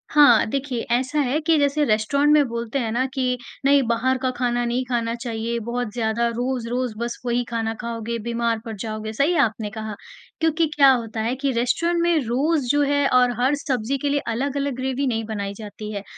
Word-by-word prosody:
हाँ, 285 Hz, -6 st, +6 dB
देखिए 265 Hz, -2 st, -2 dB
ऐसा 260 Hz, +5 st, +1 dB
है 275 Hz, +2 st, 0 dB
कि 320 Hz, 0 st, +3 dB
जैसे 285 Hz, +1 st, +2 dB
रेस्टोरेंट 280 Hz, +7 st, +3 dB
बोलते 235 Hz, +2 st, -3 dB
हैं 230 Hz, -3 st, -2 dB
ना 245 Hz, +3 st, +1 dB
कि 255 Hz, -2 st, 0 dB, 0.3 s
नहीं 280 Hz, 0 st, +5 dB
बाहर 245 Hz, +3 st, +1 dB
का 260 Hz, -1 st, +1 dB
खाना 240 Hz, -1 st, 0 dB
नहीं 240 Hz, +2 st, 0 dB
खाना 235 Hz, -2 st, -1 dB
चाहिए 235 Hz, -1 st, -3 dB
बहुत 240 Hz, -2 st, -2 dB
ज़्यादा 230 Hz, 0 st, 0 dB
रोज़-रोज़ 245 Hz, 0 st, -2 dB
बस 235 Hz, +1 st, -3 dB
वही 245 Hz, 0 st, +1 dB
खाना 225 Hz, -1 st, -1 dB
खाओगे, 235 Hz, -1 st, -4 dB
बीमार 235 Hz, 0 st, -1 dB
पड़ 225 Hz, -1 st, -5 dB
जाओगे 215 Hz, +1 st, -5 dB
सही 285 Hz, +10 st, +2 dB
आपने 220 Hz, -1 st, -4 dB
कहा, 215 Hz, -1 st, -5 dB, 0.4 s
क्योंकि 320 Hz, 0 st, +2 dB
क्या 275 Hz, -2 st, +7 dB
होता 230 Hz, -3 st, -1 dB
है 235 Hz, +3 st, -1 dB
कि 270 Hz, +1 st, -1 dB
रेस्टोरेंट 335 Hz, +9 st, +1 dB
में 340 Hz, -1 st, +3 dB
रोज़ 275 Hz, +4 st, +1 dB
जो 290 Hz, 0 st, +2 dB
है 285 Hz, 0 st, +2 dB
और 250 Hz, -1 st, +5 dB
हर 260 Hz, +4 st, +3 dB
सब्जी 270 Hz, -3 st, -2 dB
के 285 Hz, +2 st, -2 dB
लिए 285 Hz, 0 st, +1 dB
अलग-अलग 275 Hz, +3 st, -1 dB
ग्रैवी 265 Hz, +2 st, -1 dB
नहीं 225 Hz, -3 st, -1 dB
बनाई 200 Hz, -2 st, -4 dB
जाती 210 Hz, 0 st, -8 dB
है 200 Hz, -1 st, -4 dB
245 Hz, 195 wpm, -23 LUFS, 230-275 Hz, 0.4 s, क्या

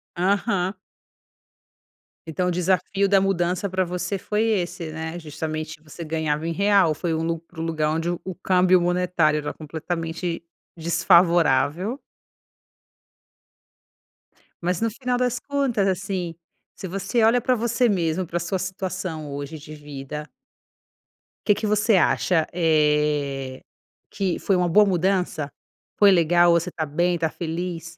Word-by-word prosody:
Aham. 190 Hz, +1 st, +1 dB, 1.5 s
Então 180 Hz, +3 st, -1 dB
o -, -, +1 dB
desafio 185 Hz, +2 st, +1 dB
da 195 Hz, -1 st, +4 dB
mudança 185 Hz, 0 st, 0 dB
para 185 Hz, 0 st, +1 dB
você 180 Hz, +3 st, -3 dB
foi 210 Hz, +3 st, -1 dB
esse, 180 Hz, -6 st, -1 dB
né, 160 Hz, +1 st, -5 dB
justamente 155 Hz, 0 st, -5 dB
você 160 Hz, +2 st, -9 dB
ganhava 160 Hz, 0 st, -1 dB
em -, -, -1 dB
real, 195 Hz, -3 st, +3 dB
foi 165 Hz, +2 st, -2 dB
um 160 Hz, -, -1 dB
lu 165 Hz, 0 st, -2 dB
um 160 Hz, -, -3 dB
lugar 155 Hz, -2 st, 0 dB
onde 165 Hz, +1 st, -1 dB
o 175 Hz, -, -2 dB
o 185 Hz, -2 st, -5 dB
câmbio 185 Hz, 0 st, +3 dB
monetário 175 Hz, -3 st, +2 dB
era 150 Hz, -, -4 dB
completamente 165 Hz, +2 st, -4 dB, 0.3 s
desfavorável. 170 Hz, -, +3 dB, 2.6 s
Mas 180 Hz, +2 st, -1 dB
no 230 Hz, -, +2 dB
final 250 Hz, +1 st, -2 dB
das 250 Hz, -1 st, 0 dB
contas 270 Hz, -8 st, 0 dB
assim, 185 Hz, -2 st, -2 dB, 0.4 s
se 190 Hz, -, -7 dB
você 200 Hz, +5 st, -1 dB
olha 230 Hz, +3 st, +5 dB
para 250 Hz, +1 st, +1 dB
você 235 Hz, +2 st, +1 dB
mesmo 180 Hz, -3 st, 0 dB
para 175 Hz, -, -2 dB
sua 175 Hz, +2 st, -2 dB
situação 185 Hz, -5 st, -4 dB
hoje 145 Hz, +2 st, -6 dB
de 155 Hz, +1 st, -11 dB
vida 150 Hz, 0 st, -8 dB, 1.2 s
que 205 Hz, -, +4 dB
que 215 Hz, -, -2 dB
você 210 Hz, +1 st, +3 dB
acha, 170 Hz, -1 st, +2 dB
eh, 150 Hz, -5 st, +1 dB, 0.5 s
que 190 Hz, -3 st, -1 dB
foi 195 Hz, -, +1 dB
uma 180 Hz, -1 st, +1 dB
boa 210 Hz, +5 st, +6 dB
mudança? 180 Hz, -5 st, 0 dB, 0.5 s
Foi 205 Hz, -1 st, +7 dB
legal, 175 Hz, 0 st, +4 dB
você 170 Hz, +1 st, +1 dB
está 160 Hz, -2 st, -3 dB
bem, 170 Hz, +4 st, +1 dB
está 165 Hz, -1 st, 0 dB
feliz? 170 Hz, 0 st, -5 dB
175 Hz, 135 wpm, -23 LUFS, 160-195 Hz, 2.6 s, Foi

